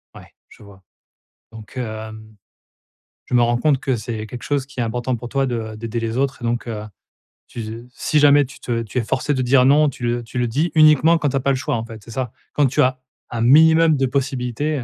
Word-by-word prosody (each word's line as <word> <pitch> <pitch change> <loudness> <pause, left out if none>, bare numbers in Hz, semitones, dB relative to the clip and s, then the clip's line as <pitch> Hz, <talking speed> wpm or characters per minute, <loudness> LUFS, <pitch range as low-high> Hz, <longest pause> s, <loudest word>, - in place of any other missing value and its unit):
Ouais, - - -14 0.2
je - - -17
vois. 100 -2 -16 0.7
Donc, 110 +2 -13
hem, 110 -2 -7 0.9
je - - -9
me 120 - +5
rends 120 0 +2
compte 140 +1 +2
que 135 -1 -1
c'est 110 -1 -5
quelque 120 +2 -9
chose 140 -2 -1
qui 135 -1 -11
est - - +1
important 120 +2 -2
pour 120 +1 -8
toi 135 +1 0
de 115 -4 -4
d'aider 115 +1 -4
les 115 +1 -3
autres 135 -1 -1
et - - -4
donc 120 +1 -2
heu, 110 -2 -5 0.6
tu 120 - -7
z 115 +2 -7
si 150 +4 0
jamais 145 0 +5
tu 150 +4 -14
te 115 -1 -2
tu 115 +3 -7
es 125 - +1
forcée 135 +5 -1
de 130 - -1
dire: 125 +1 +4
«Non», 145 +2 +5
tu 125 - -10
le 120 0 -1
tu 115 +2 -9
le 120 - +1
dis 150 +9 -1
uniquement 155 +1 +6
quand 150 -3 0
tu 135 - -3
as - - +2
pas 140 +1 +1
le - - +1
choix 130 - -2
en 115 -1 -3
fait, 115 -2 -11
c'est 115 - -12
ça? 125 0 -3 0.2
Quand 145 - +3
tu 130 - +1
as 130 0 +1 0.3
un 115 - -4
minimum 160 +5 +5
de 135 - +1
possibilités, 135 +2 -2
heu, - - -5
125 Hz, 245 wpm, -20 LUFS, 115-140 Hz, 0.9 s, uniquement